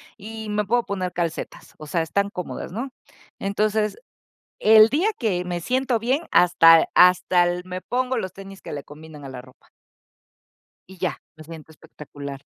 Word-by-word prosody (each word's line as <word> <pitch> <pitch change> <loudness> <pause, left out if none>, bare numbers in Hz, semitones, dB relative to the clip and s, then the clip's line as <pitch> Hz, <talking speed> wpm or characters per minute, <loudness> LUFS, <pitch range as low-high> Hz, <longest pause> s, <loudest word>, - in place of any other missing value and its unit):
y 220 +1 -8
me 210 0 0
puedo 235 +4 +1
poner 185 -2 -3
calcetas, 170 -2 -5
o 155 - -10
sea, 165 +3 -1
están 200 +5 -1
cómodas, 180 -3 -6
¿no? 245 +8 -5 0.5
Entonces, 210 +2 -1 0.6
el 215 0 +7
día 330 - +1
que 190 -6 -1
me 175 -1 -4
siento 255 +6 0
bien, 250 +7 0
hasta 165 -2 +6
hasta 180 0 +5
el 175 0 -2
me 185 0 -6
pongo 255 +4 -2
los 185 -1 -4
tenis 195 0 -12
que - - -9
le 145 -1 -6
combinan 150 0 -13
a - - -7
la 130 -1 -8
ropa. 130 0 -21 1.2
Y 190 - -13
ya, 180 -1 -3
me 155 - -13
siento 160 0 -12
espectacular. 140 -3 -10
185 Hz, 165 wpm, -23 LUFS, 165-215 Hz, 1.2 s, el